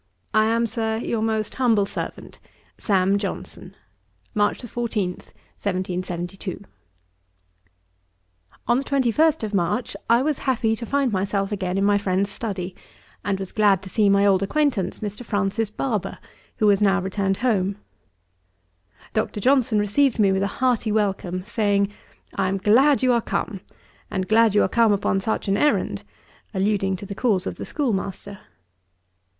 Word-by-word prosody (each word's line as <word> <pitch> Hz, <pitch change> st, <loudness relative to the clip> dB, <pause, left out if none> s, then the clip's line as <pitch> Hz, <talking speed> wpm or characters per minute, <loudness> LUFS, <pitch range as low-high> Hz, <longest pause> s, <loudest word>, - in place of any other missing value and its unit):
I 215 Hz, 0 st, +4 dB
am, 230 Hz, +1 st, +2 dB
Sir, 220 Hz, -1 st, -1 dB
'Your 225 Hz, -1 st, -2 dB
most 220 Hz, -1 st, -1 dB
humble 230 Hz, -6 st, +2 dB
servant, -, -, -7 dB, 0.4 s
'SAM. 195 Hz, -1 st, +2 dB
JOHNSON.' 195 Hz, -1 st, -6 dB, 0.6 s
'March 205 Hz, 0 st, +1 dB
14, 230 Hz, -5 st, -2 dB
1772.' 185 Hz, 0 st, -5 dB, 2.0 s
On 240 Hz, +2 st, +3 dB
the -, -, -3 dB
21st 280 Hz, +3 st, +2 dB
of 215 Hz, -1 st, -3 dB
March, 200 Hz, +5 st, -1 dB
I 235 Hz, +2 st, +5 dB
was 300 Hz, -1 st, 0 dB
happy 230 Hz, -4 st, +1 dB
to 235 Hz, +1 st, -7 dB
find 275 Hz, -1 st, +1 dB
myself 195 Hz, 0 st, -1 dB
again 185 Hz, -2 st, -2 dB
in 195 Hz, -, +1 dB
my 205 Hz, 0 st, +3 dB
friend's 200 Hz, 0 st, 0 dB
study, 195 Hz, -4 st, -5 dB, 0.5 s
and 195 Hz, -1 st, -1 dB
was 190 Hz, -1 st, -6 dB
glad 205 Hz, -3 st, +3 dB
to 190 Hz, -, -9 dB
see 210 Hz, -3 st, +3 dB
my 200 Hz, 0 st, +4 dB
old 195 Hz, -2 st, +4 dB
acquaintance, 210 Hz, -4 st, 0 dB
Mr. 210 Hz, +3 st, -5 dB
Francis 205 Hz, 0 st, -1 dB
Barber, 210 Hz, -4 st, -3 dB, 0.4 s
who 215 Hz, -, +1 dB
was 205 Hz, -1 st, +4 dB
now 195 Hz, -1 st, +4 dB
returned 195 Hz, 0 st, -1 dB
home. 200 Hz, -4 st, +1 dB, 1.4 s
Dr. 215 Hz, -1 st, -1 dB
Johnson 250 Hz, -1 st, +3 dB
received 220 Hz, +6 st, +2 dB
me 200 Hz, -3 st, +4 dB
with 190 Hz, 0 st, +1 dB
a 200 Hz, -, +1 dB
hearty 245 Hz, -4 st, +1 dB
welcome; 190 Hz, -4 st, -1 dB
saying, 205 Hz, -2 st, +1 dB, 0.4 s
'I 195 Hz, -2 st, 0 dB
am 195 Hz, +1 st, 0 dB
glad 255 Hz, +8 st, +4 dB
you 255 Hz, -1 st, +4 dB
are 235 Hz, -, +2 dB
come, 210 Hz, -2 st, -3 dB, 0.5 s
and 185 Hz, -1 st, -2 dB
glad 220 Hz, -1 st, +4 dB
you 205 Hz, -, +5 dB
are -, -, +2 dB
come 230 Hz, +2 st, +3 dB
upon 195 Hz, -1 st, +1 dB
such 220 Hz, +2 st, -2 dB
an 195 Hz, 0 st, +2 dB
errand:' 295 Hz, +6 st, +1 dB, 0.5 s
(alluding 195 Hz, 0 st, +1 dB
to 185 Hz, -, -8 dB
the 200 Hz, -, -6 dB
cause 200 Hz, -3 st, +1 dB
of -, -, -4 dB
the -, -, -6 dB
schoolmaster.) 200 Hz, -6 st, -3 dB
205 Hz, 155 wpm, -23 LUFS, 195-230 Hz, 2.0 s, I